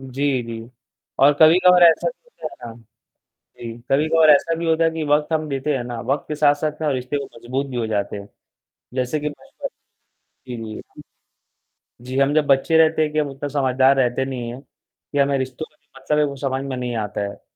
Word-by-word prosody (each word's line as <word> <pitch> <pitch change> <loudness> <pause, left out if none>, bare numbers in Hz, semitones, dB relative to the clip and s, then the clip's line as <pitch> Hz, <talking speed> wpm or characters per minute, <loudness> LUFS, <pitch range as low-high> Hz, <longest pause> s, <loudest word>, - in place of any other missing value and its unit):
जी, 135 0 -1
जी 115 -1 -7 0.6
और 140 +2 +6
कभी-कभार 180 +3 +6
ऐसा 165 -1 +5
भी - - -10
होता - - -16 0.2
है 115 - -8
ना - - -14 0.8
जी, 115 -1 -7 0.2
कभी-कभार 155 +3 +4
ऐसा 150 +3 +4
भी 170 - -3
होता 165 0 +2
है 165 - +3
कि 160 0 -4
वक़्त 150 +2 +1
हम 155 -1 -1
देते 140 +2 -1
हैं 125 - -3
ना, 120 -1 -5
वक़्त 135 +4 -2
के 150 - -2
साथ-साथ 150 +1 +1
ना 155 -2 0
रिश्ते 130 +2 -2
वो 140 - -3
मज़बूत 130 +4 -3
भी 125 - -5
हो 115 - -1
जाते 105 -2 -2
हैं। 100 0 -9 0.7
जैसे 130 +4 -1
कि 150 +1 -2
बचपन 145 - -9 0.8
जी, 125 - -5
जी। 110 -1 -7
हम - - -12 1.0
जी, 130 +2 -4
हम 140 +2 +3
जब 155 -2 +2
बच्चे 140 +4 +3
रहते 160 0 +4
हैं 150 -1 -1
कि 155 - -2
हम 150 - +1
उतने 135 +1 -6
समझदार 135 -1 +2
रहते 130 0 +1
नहीं 125 -3 -5
हैं 130 +3 -10 0.5
या 140 - +4
हमें 140 0 0
रिश्तों 130 +3 -4
का 150 - -33
जो 135 - -20
मतलब 150 +3 0
है 150 - +4
वो 140 -1 -4
समझ 135 0 -2
में 135 -2 -4
नहीं 125 -1 -3
आता 105 -1 -3
है। - - -13
140 Hz, 220 wpm, -21 LUFS, 125-150 Hz, 1.0 s, और